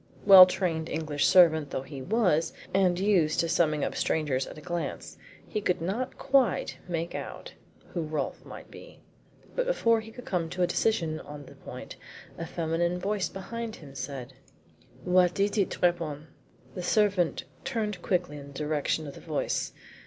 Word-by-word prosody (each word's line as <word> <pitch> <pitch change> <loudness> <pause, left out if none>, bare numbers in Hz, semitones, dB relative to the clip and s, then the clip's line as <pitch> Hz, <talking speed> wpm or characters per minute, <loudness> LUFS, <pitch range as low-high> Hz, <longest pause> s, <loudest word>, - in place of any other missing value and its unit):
Well 190 -2 +11
trained 175 -4 -1
English 150 -2 0
servant 160 -5 +5
though 130 - -3
he 135 0 -8
was, 175 - +1 0.2
and 185 -2 +3
used 185 -6 +2
to 165 - +2
summing 155 -3 +2
up - - -4
strangers 145 -4 0
at - - -10
a - - -7
glance, 175 +1 -4 0.3
he 215 - -3
could 180 -3 0
not 210 +10 -3
quite 270 -6 +1
make 170 -1 -3
out - - -7 0.4
who 175 - -3
Rolfe 155 -3 -3
might - - -11
be. - - -13 0.5
But - - 0
before 230 - +3
he 220 - -11
could 245 +2 -11
come 170 -3 -1
to 180 +2 -1
a - - +6
decision 170 -6 0
on 145 -1 -9
the - - -13
point - - -10 0.4
a 165 - -6
feminine 170 +1 -1
voice 200 +1 -1
behind 225 +4 -6
him 140 -4 -13
said: 135 -1 -6 0.7
"What 180 0 +3
is 200 +1 +2
it, 200 -3 +2
Trappon?" 160 -4 -1 0.4
The 185 - -5
servant 195 -2 +2 0.2
turned 215 -8 -2
quickly 175 -5 -1
in 140 - -10
the 140 - -12
direction 150 +2 -1
of 140 - -7
the - - -12
voice. 155 -3 -2
175 Hz, 170 wpm, -28 LUFS, 155-195 Hz, 0.7 s, Well